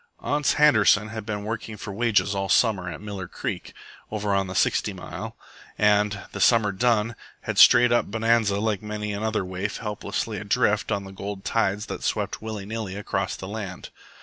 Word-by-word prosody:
Ans 145 -1 +1
Handerson 110 -7 +5
had 110 -2 -7
been 105 -1 -3
working 110 0 -5
for 105 0 -7
wages 110 -2 +2
all 95 0 -2
summer 100 -7 +3
at 80 0 -7
Miller 100 -3 -6
Creek - - -5 0.4
over 105 -1 -1
on 95 -1 +1
the 95 - -6
Sixty - - +1
Mile, - - -7 0.4
and, 105 -1 +3
the - - -6
summer 110 -4 +4
done, 115 +1 +1 0.3
had - - -2
strayed 120 0 +8
up 120 - +2
Bonanza 110 -1 +2
like 105 -2 0
many 105 -1 -4
another 110 -1 -1
waif 95 +3 -4
helplessly 105 0 -3
adrift 105 +1 +1
on 100 -2 0
the 95 - -9
gold 100 0 -7
tides 105 -2 0
that - - -6
swept - - -2
willy 110 -2 -5
nilly 110 -2 -5
across 100 -2 -2
the 95 - -8
land. 100 -3 -6
105 Hz, 175 wpm, -25 LUFS, 100-110 Hz, 0.4 s, strayed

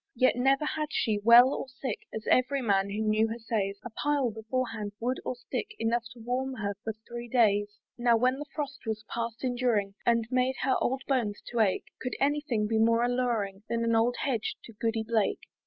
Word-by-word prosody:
Yet 255 -2 +4
never 270 +4 +2
had 305 0 -2
she, 220 -8 +1
well 235 +5 +7
or - - -4
sick, 260 -2 -5
As 220 - -6
every 255 +1 +2
man 200 -3 +2
who 210 +2 -2
knew 215 +1 +3
her 225 +1 -4
says, 210 -4 -2
A 245 - -6
pile 285 -1 0
before 225 +4 -2
hand, 210 -3 -5
wood 250 +3 -1
or - - -3
stick, 420 - -5
Enough 235 +1 0
to 240 - -15
warm 255 +3 -2
her 205 -3 -2
for 220 - -3
three 240 0 -6
days. 205 -4 +2 0.2
Now, 240 -1 +4
when 255 +3 +2
the 295 - -6
frost 285 -5 -5
was 215 -1 -3
past 230 +1 -4
enduring, 240 -6 +1
And 230 -1 +2
made 255 +1 +2
her 260 - +3
poor - - +2
old 265 +1 -3
bones 235 -7 0
to 240 - -1
ache, 205 -4 +2 0.2
Could 250 - -3
any 290 +2 +2
thing 230 -8 -1
be 220 +1 +1
more 230 +1 +4
alluring, 240 -6 0
Than 230 0 0
an 230 0 +2
old 235 +2 +3
hedge 240 -6 -1
to 230 - -12
Goody 225 +1 -1
Blake? 220 -2 0
235 Hz, 215 wpm, -29 LUFS, 220-255 Hz, 0.2 s, well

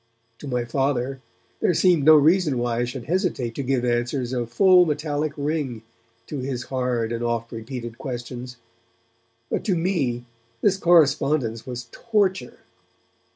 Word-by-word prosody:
To 145 - -8
my 125 -2 -1
Father 135 +1 -1 0.4
there 175 - +2
seemed 175 -5 +4
no 155 0 +9
reason 155 -1 +4
why 120 -1 -1
I 120 - +1
should 125 0 -6
hesitate 165 - -1
to 140 - -4
give 130 -2 0
answers 120 +1 -1
of 120 -2 -3
full 185 +6 +6
metallic 150 0 -1
ring 140 -6 -2 0.4
to 145 - -5
his 130 -1 -3
hard 125 -4 -1
and 115 0 -3
oft 115 -1 -2
repeated 120 0 -7
questions; 125 -1 -6 0.9
but - - -1
to 190 - +2
me 150 -9 -1 0.4
this 200 -2 +3
correspondence 145 - +2
was 120 -1 -6
torture. 195 - -1
130 Hz, 145 wpm, -23 LUFS, 120-155 Hz, 0.9 s, no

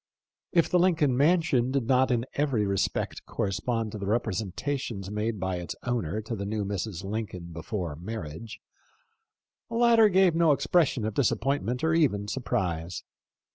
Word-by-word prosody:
If 170 -3 +3
the 180 - +2
Lincoln 165 -7 +3
mansion 145 -4 +3
did 135 -2 0
not 130 +2 +3
in 120 -1 +1
every 135 -8 +1
respect 100 -1 -1
correspond 110 +3 -2
to 105 - -6
the 100 - -4
representations 110 0 -2
made 105 0 -2
by 95 -1 -2
its 85 -1 -5
owner 110 -6 -1
to 115 +2 -5
the 100 - -4
new 105 0 -2
Mrs. 100 -2 -4
Lincoln 95 -4 -5
before 85 -1 -4
marriage, 90 +3 -7 1.1
the 230 - -5
latter 230 -2 +6
gave 190 -2 +4
no 165 -2 +4
expression 140 -6 +2
of 110 - -2
disappointment 125 +2 0
or 160 0 +2
even 115 -11 +2
surprise. 90 -8 -2
115 Hz, 150 wpm, -27 LUFS, 100-140 Hz, 1.1 s, latter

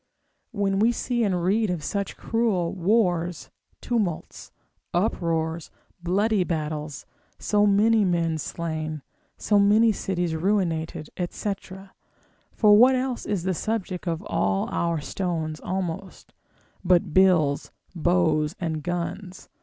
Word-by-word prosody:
when 200 -4 0
we 225 +3 +4
see 240 0 -1
and 185 -5 0
read 210 +4 +2
of 175 -4 -3
such 200 +4 -3
cruel 215 -7 0
wars, 180 -3 0 0.3
tumults, 210 -9 -3 0.4
uproars, 165 -4 -1 0.3
bloody 200 +3 +1
battles, 155 -3 -4 0.3
so 210 0 +2
many 215 +2 +4
men 170 -3 0
slain, 155 -2 -4 0.3
so 205 -1 +2
many 215 +3 +5
cities 180 -4 -2
ruinated, 165 -4 -1 0.2
&c. 205 - -2 1.0
(for 210 -2 +5
what 250 +5 +7
else 255 -1 -2
is 200 -5 -1
the 190 0 0
subject 190 -2 -3
of 165 +2 -2
all 95 - 0
our 170 -2 0
stones 160 -1 -3
almost, 185 0 -5 0.5
but 180 -2 +2
bills, 175 -7 +3 0.2
bows, 165 -2 +1
and 160 -3 -2
guns!) 175 +3 -5
180 Hz, 115 wpm, -25 LUFS, 165-205 Hz, 1.0 s, what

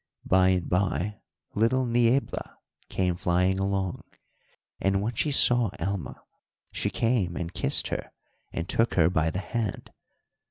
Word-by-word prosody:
By 95 0 +4
and 90 -2 +1
by 95 +2 -1 0.3
little 120 +5 +2
Niebla 120 +2 0 0.3
came 90 -2 0
flying 90 +2 +1
along, 95 -2 -1 0.8
and 95 0 +1
when 110 +4 -2
she 145 +6 0
saw 120 -4 +5
Alma 95 +1 -4 0.5
she 100 - -1
came 100 -3 0
and 85 0 -4
kissed - - 0
her - - -4 0.4
and 80 - -4
took 115 +5 +1
her 85 -1 +4
by 80 -2 +1
the 85 - -4
hand. 110 +1 -4
95 Hz, 135 wpm, -27 LUFS, 90-115 Hz, 0.8 s, saw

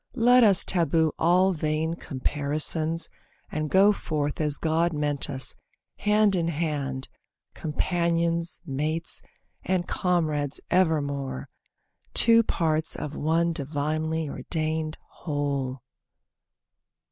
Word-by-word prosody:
Let 245 +1 +5
us 200 -4 +5
taboo 165 -3 +3
all 185 +3 +3
vain 155 0 -1
comparisons, 155 +2 0 0.4
And 155 0 -2
go 195 +4 +5
forth 150 -5 -3
as 150 -1 +2
God 165 +1 +1
meant 145 -2 -1
us, 135 -2 +1 0.4
hand 210 -1 +3
in 170 -2 0
hand, 145 -5 -3 0.5
Companions, 170 +1 -1
mates, 155 +3 -2 0.4
and 180 -2 -1
comrades 155 -6 0
evermore; 140 - 0 0.7
Two 230 0 +6
parts 160 -7 0
of 150 0 -6
one 165 +2 +1
divinely 155 +2 -2
ordained 155 +3 -3 0.2
whole. 140 -4 -3
160 Hz, 100 wpm, -26 LUFS, 145-170 Hz, 0.7 s, Two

